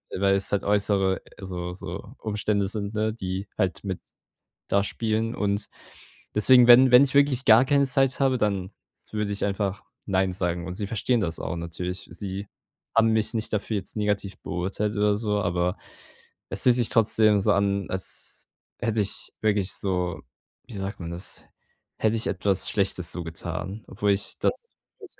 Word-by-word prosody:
weil 100 +1 +2
es 100 - -1
halt 100 - +1
äußere 100 -2 +1 0.2
so 90 -2 -5
so 95 +4 -8
Umstände 105 -2 -1
sind, 105 0 -4
ne, 110 0 0
die 95 -2 -4
halt 90 -5 -1
mit 95 -2 -3 0.7
da 100 - +3
spielen 110 +1 -1
und 100 0 -1 0.7
deswegen, 125 +3 +6
wenn 125 +1 +8
wenn 125 +3 +8
ich 135 - -3
wirklich 140 -2 +3
gar 115 +2 +7
keine 140 -1 +3
Zeit 135 0 +1
habe, 135 -2 +3
dann 100 -4 -1 0.4
würde 105 -1 -1
ich 100 - -2
einfach 100 0 -2 0.2
nein 95 -1 +1
sagen. 90 -2 -2
Und 90 - -4
sie 100 +1 -3
verstehen 115 +3 0
das 85 -5 -2
auch 85 - -4
natürlich. 90 +2 -5
Sie 100 0 -6 0.5
haben 115 0 +5
mich 110 +1 0
nicht 110 - -2
dafür 105 +1 -1
jetzt 100 +2 -5
negativ 105 -2 -1
beurteilt 95 +4 -2
oder 105 0 +3
so, 105 -1 -1
aber 90 0 0 0.7
es - - +2
fühlt 125 -2 +5
sich 120 -3 +2
trotzdem 110 -2 +4
so 105 +1 +3
an, 100 -1 +1
als 95 0 -2 0.3
hätte 115 -2 0
ich 100 - -6
wirklich 100 -3 +1
so- 90 -3 -2 0.5
wie 115 - -11
sagt 95 0 -5
man 85 -1 -5
das- 85 +2 -6 0.5
hätte 110 +1 +2
ich 110 - -2
etwas 95 0 0
Schlechtes 95 -4 0
so 90 - -4
getan, 85 +5 -5
obwohl 100 +1 +1
ich 100 +1 -3
das 465 -1 -1 0.3
jetzt 400 - -6
100 Hz, 170 wpm, -25 LUFS, 95-110 Hz, 0.7 s, wenn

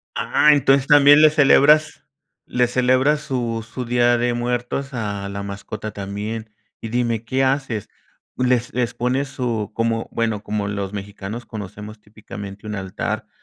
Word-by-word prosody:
Ah, 150 - +3
entonces 135 -1 +3
también 145 0 +7
le 155 - +8
celebras 150 +1 +4 0.4
le 125 0 +1
celebras 130 +4 +2
su 120 -6 -3
su 125 +1 -6
Día 120 0 +3
de 120 0 0
Muertos 125 +3 -3
a 100 -4 -4
la 100 0 -5
mascota 100 +2 -6
también. 105 +2 -5 0.3
Y 115 - -5
dime, 115 -1 -1
¿qué 130 +4 0
haces?, 130 -6 -1 0.5
les 125 -1 +1
les 120 -1 -1
pones 130 +3 -1
su 115 -5 -3
como, 115 0 -1
bueno, 110 -3 -1
como 105 -1 -2
los 100 -1 -4
mexicanos 100 +3 -7
conocemos 105 0 -8
típicamente 105 -1 -10
un 105 - -5
altar, 95 -2 -4
115 Hz, 150 wpm, -21 LUFS, 105-130 Hz, 0.5 s, le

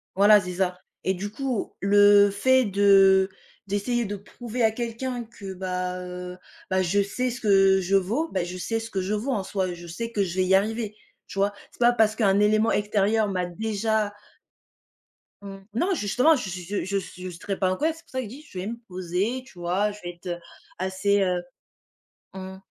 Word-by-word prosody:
Voilà, 205 +2 +7
c'est 180 -1 -5
ça 180 0 -1 0.3
et 190 - +2
du 195 +3 -4
coup, 255 -1 -3
le 205 0 +6
fait 260 +6 +3
de 195 -1 +5 0.4
d'essayer 230 +4 0
de 205 0 -4
prouver 235 +4 -5
à 220 - +4
quelqu'un 240 +2 -4
que, 200 -4 -9
bah, 180 -1 -3
heu, 180 0 -7 0.3
bah, 185 0 +2
je 190 +3 +2
sais 250 +6 -1
ce 245 +1 -5
que 195 -2 +5
je 190 +2 +1
vaux, 230 - -1
ben, 185 -2 0
je 180 +1 -6
sais 225 +5 -2
ce 225 0 -7
que 195 -3 -2
je 190 +3 -2
vaux 220 +6 -1
en 210 -7 -1
soi, 190 -2 -2
je 175 0 -10
sais 230 +8 -5
que 210 - 0
je 175 -2 -4
vais 185 - +3
y 185 - +2
arriver, 215 +2 0 0.3
tu 195 - -6
vois? 200 +1 +3 0.2
C'est - - -21
pas 240 0 +6
parce 220 -2 +3
qu'un 200 -3 +3
élément 215 +2 +3
extérieur 210 +1 +2
m'a 185 -2 -1
déjà 215 +2 -1 1.3
Mmh. 195 -1 -8 0.2
Non, 350 - +1
justement, 250 - +3
je 250 -8 -4
s 180 - -4
je 185 +3 -3
je 200 +1 -1 0.2
je 185 - -5
serais 185 +3 -5
pas 185 -1 +2
en - - 0
colère, 315 +2 +1
c'est 325 - -16
pour - - -24
ça 260 - -2
que 255 - -3
je - - -8
dis: 265 +7 -10
«Je 185 - -7
vais 185 - -4
me 230 +2 -4
poser», 185 +7 -2
tu 185 -9 -16
vois? 185 +5 0
Je 205 - -11
vais 175 - -4
être, 175 - -13
heu, 175 -1 -3 0.4
assez, 190 +2 +1
heu 180 -2 +1 0.9
mmh. 190 0 -8
200 Hz, 215 wpm, -25 LUFS, 185-225 Hz, 1.3 s, Voilà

